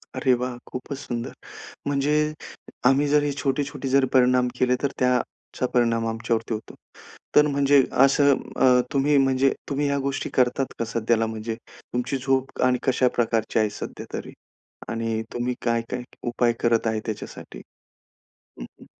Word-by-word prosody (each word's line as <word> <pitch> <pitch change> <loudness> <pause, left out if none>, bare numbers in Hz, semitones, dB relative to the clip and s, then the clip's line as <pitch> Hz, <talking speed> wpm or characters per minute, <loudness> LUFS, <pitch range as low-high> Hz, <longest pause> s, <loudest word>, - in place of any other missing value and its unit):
अरे 130 -4 +3
वाह! 125 0 -2
खूपच 130 +2 -6
सुंदर, 120 -4 -5 0.5
म्हणजे 145 +1 +1 0.7
आम्ही 135 +3 +4
जर 145 0 +3
छोटे-छोटे 140 0 -2
जरी 135 0 +3
परिणाम 125 -1 +4
केले, 125 0 +3
तर 140 - +2
त्याचा 125 0 -1
परिणाम 115 -2 +2
आमच्यावरती 115 0 -1
होतो. 110 - -8 0.6
तर, 150 0 +7
म्हणजे 140 -1 +4 0.2
असं 140 +1 +4 0.2
अ, 125 -1 +5
तुम्ही, 140 +1 +3
म्हणजे 135 0 +3 0.2
तुम्ही 145 0 0
या 140 - +1
गोष्टी 135 - -3
करतात 130 +1 +1
कसं? 115 0 -2
त्याला, 115 -1 +3
म्हणजे 110 0 -4 0.2
तुमची 125 +3 -3
झोप 135 0 -1
आणि 125 0 +3
कशा 130 -1 +3
प्रकारची 115 -1 +1
आहे 110 -1 +2
सध्यातरी? - - -7 0.6
आणि 115 0 -2
तुम्ही 120 +1 -2
काय, 115 -1 +2
काय 125 0 -3 0.2
उपाय 120 0 +2
करत 115 -1 +2
आहे 110 -1 0
त्याच्यासाठी? 110 -2 -7 1.0
हं, - - -6 0.2
हं. - - -13
125 Hz, 145 wpm, -24 LUFS, 115-135 Hz, 1.0 s, तर